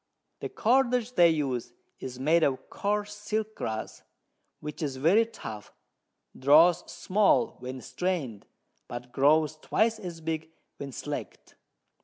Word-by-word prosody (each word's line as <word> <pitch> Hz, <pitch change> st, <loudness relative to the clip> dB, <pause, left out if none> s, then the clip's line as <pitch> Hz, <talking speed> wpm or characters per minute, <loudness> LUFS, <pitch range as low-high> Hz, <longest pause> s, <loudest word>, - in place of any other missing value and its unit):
The -, -, -4 dB
Cordage 250 Hz, 0 st, +2 dB
they 175 Hz, -6 st, +6 dB
use 130 Hz, -7 st, -1 dB, 0.3 s
is 130 Hz, -1 st, -7 dB
made 160 Hz, +5 st, +3 dB
of 135 Hz, -4 st, 0 dB
coarse 210 Hz, 0 st, -1 dB
Silk 215 Hz, +1 st, -3 dB
Grass, 110 Hz, -, -5 dB, 0.6 s
which 150 Hz, +2 st, -7 dB
is 140 Hz, -4 st, -2 dB
very 190 Hz, +12 st, +4 dB
tough, 110 Hz, -, -9 dB, 0.6 s
draws 160 Hz, +6 st, +5 dB
small 210 Hz, +3 st, +2 dB
when 130 Hz, +1 st, -6 dB
strain'd, 150 Hz, -, -3 dB, 0.4 s
but 120 Hz, 0 st, -7 dB
grows 155 Hz, +3 st, +3 dB
twice 220 Hz, +7 st, +1 dB
as 175 Hz, -5 st, -7 dB
big 160 Hz, 0 st, -3 dB, 0.3 s
when 140 Hz, -1 st, -6 dB
slack'd. -, -, -6 dB
160 Hz, 125 wpm, -28 LUFS, 135-210 Hz, 0.6 s, they